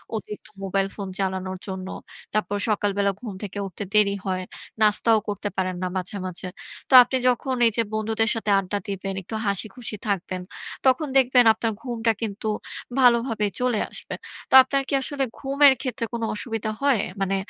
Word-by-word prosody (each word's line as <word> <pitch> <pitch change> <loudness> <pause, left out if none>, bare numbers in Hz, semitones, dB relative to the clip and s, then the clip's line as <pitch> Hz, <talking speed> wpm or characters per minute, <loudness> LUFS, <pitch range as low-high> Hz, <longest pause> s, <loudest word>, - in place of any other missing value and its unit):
অতিরিক্ত 210 -1 -7 0.2
mobile 195 0 0
phone 200 -2 -5
চালানোর 190 -1 -2
জন্য। 190 -1 -5 0.5
তারপর 205 -1 0
সকালবেলা 200 -1 +1
ঘুম 225 -5 -6
থেকে 200 0 -6
উঠতে 190 +2 -7
দেরি 205 -1 +4
হয়। 185 -1 -1 0.4
নাস্তাও 215 +1 +4
করতে 205 0 -3
পারেন 185 -1 0
না 185 - 0
মাঝে, 185 +2 -4
মাঝে। 185 0 -4 0.4
তো - - -1
আপনি 260 - -1
যখন 255 +1 +1
এইযে 230 +1 +1
বন্ধুদের 220 +1 +1
সাথে 220 -2 -1
আড্ডা 195 +1 -3
দিবেন, 195 0 -4
একটু 190 - -7
হাসিখুশি 210 +3 -2
থাকবেন। 185 -2 -2 0.4
তখন 265 +4 +3
দেখবেন 250 -2 +5
আপনার 225 0 -2
ঘুমটা 235 -3 0
কিন্তু 220 0 -4 0.5
ভালোভাবে 235 -3 +4
চলে 250 -3 +1
আসবে। - - -7 0.3
তো - - -5
আপনার 275 +1 0
কি - - -3
আসলে 275 +1 -2 0.2
ঘুমের 275 +1 +5
ক্ষেত্রে 245 -3 -3
কোন 235 - -3
অসুবিধা 220 -1 -3
হয়? 275 -7 +3 0.2
মানে 195 0 +1
215 Hz, 160 wpm, -24 LUFS, 195-240 Hz, 0.5 s, দেখবেন